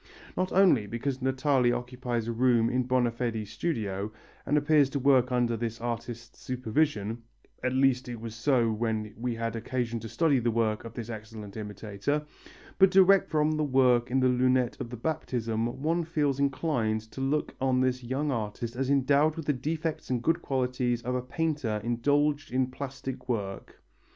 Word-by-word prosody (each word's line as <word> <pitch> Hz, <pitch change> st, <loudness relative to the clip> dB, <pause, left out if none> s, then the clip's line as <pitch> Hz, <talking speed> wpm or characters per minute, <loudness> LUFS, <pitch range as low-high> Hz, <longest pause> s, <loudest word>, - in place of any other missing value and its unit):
Not 185 Hz, 0 st, -1 dB
only 175 Hz, -, +4 dB
because 125 Hz, +5 st, -3 dB
Natali 130 Hz, -1 st, +2 dB
occupies 120 Hz, -1 st, -3 dB
a -, -, -1 dB
room 115 Hz, -1 st, +3 dB
in 125 Hz, 0 st, 0 dB
Bonafedi's 120 Hz, -4 st, 0 dB
studio, 105 Hz, -, -2 dB, 0.4 s
and 150 Hz, -, +3 dB
appears 145 Hz, -2 st, +4 dB
to 140 Hz, -, -2 dB
work 130 Hz, -2 st, +4 dB
under 120 Hz, -2 st, +1 dB
this 115 Hz, 0 st, -4 dB
artist's 120 Hz, 0 st, -5 dB
supervision 120 Hz, -3 st, -1 dB, 0.4 s
at 130 Hz, -, 0 dB
least 130 Hz, -1 st, +2 dB
it 120 Hz, -2 st, -5 dB
was 115 Hz, -1 st, -6 dB
so 120 Hz, -1 st, +2 dB
when 110 Hz, -1 st, -2 dB
we 120 Hz, +1 st, -3 dB
had 115 Hz, 0 st, -3 dB
occasion 120 Hz, 0 st, -2 dB
to 115 Hz, +1 st, -8 dB
study 150 Hz, -2 st, +2 dB
the 120 Hz, 0 st, 0 dB
work 110 Hz, -1 st, 0 dB
of 115 Hz, -, -9 dB
this 120 Hz, 0 st, -5 dB
excellent 110 Hz, -2 st, -8 dB
imitator 105 Hz, +7 st, -3 dB, 0.5 s
but 190 Hz, 0 st, +7 dB
direct 190 Hz, 0 st, +5 dB
from 155 Hz, -1 st, +2 dB
the 155 Hz, 0 st, 0 dB
work 130 Hz, -3 st, +3 dB
in 130 Hz, +2 st, +2 dB
the 130 Hz, -, +4 dB
lunette 125 Hz, 0 st, +2 dB
of 120 Hz, -, -5 dB
the 125 Hz, -, -7 dB
Baptism 115 Hz, -5 st, -2 dB, 0.2 s
one 165 Hz, +2 st, +1 dB
feels 150 Hz, -4 st, 0 dB
inclined 130 Hz, -6 st, 0 dB
to 135 Hz, -, -6 dB
look 140 Hz, +3 st, 0 dB
on 130 Hz, -1 st, +2 dB
this 130 Hz, -1 st, 0 dB
young 135 Hz, +4 st, -1 dB
artist 115 Hz, 0 st, -3 dB
as 135 Hz, +1 st, -1 dB
endowed 140 Hz, +3 st, +3 dB
with 160 Hz, -, -6 dB
the 150 Hz, -, +2 dB
defects 155 Hz, +4 st, -3 dB
and 125 Hz, -2 st, -1 dB
good 165 Hz, +4 st, +2 dB
qualities 125 Hz, -2 st, -1 dB
of 125 Hz, -, -2 dB
a 125 Hz, -, 0 dB
painter 135 Hz, -5 st, -2 dB
indulging 145 Hz, +4 st, +1 dB
in 130 Hz, 0 st, +1 dB
plastic 135 Hz, -1 st, -6 dB
work. 100 Hz, -5 st, -4 dB
125 Hz, 175 wpm, -28 LUFS, 115-140 Hz, 0.5 s, but